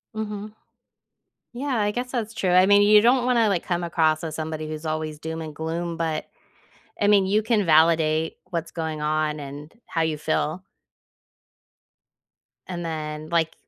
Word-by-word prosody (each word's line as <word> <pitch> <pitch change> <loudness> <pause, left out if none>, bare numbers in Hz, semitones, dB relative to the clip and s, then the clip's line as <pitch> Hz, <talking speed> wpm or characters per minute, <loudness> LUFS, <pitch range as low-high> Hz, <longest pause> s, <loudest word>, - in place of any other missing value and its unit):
Mhm. 210 -1 -5 1.0
Yeah. 260 +1 -2
I 205 0 +1
guess 245 +4 -4
that's 225 -3 -3
true. 190 -4 0
I 185 +1 +6
mean, 205 +1 +6
you 210 +1 +7
don't 245 +3 +4
wanna, 235 -3 +3
like, 185 -4 0
come 175 -1 -1
across 160 -2 +1
as 160 -2 -5
somebody 155 -1 -4
who's 155 +1 -6
always 155 -1 -3
doom 160 +1 -5
and 155 -2 -7
gloom, 165 +2 -3
but, 160 -2 -2 0.7
I 205 - +3
mean, 200 -2 +5
you 210 +3 +2
can 215 -2 +1
validate 160 0 +3
what's 165 -1 -3
going 160 -2 -4
on 155 0 0
and 145 +2 -9
how 165 - -2
you 160 -1 0
feel. 155 +3 -1 2.0
And 175 -2 -5
then, 155 -1 -5
like, 165 -1 +1
165 Hz, 160 wpm, -24 LUFS, 155-205 Hz, 2.0 s, you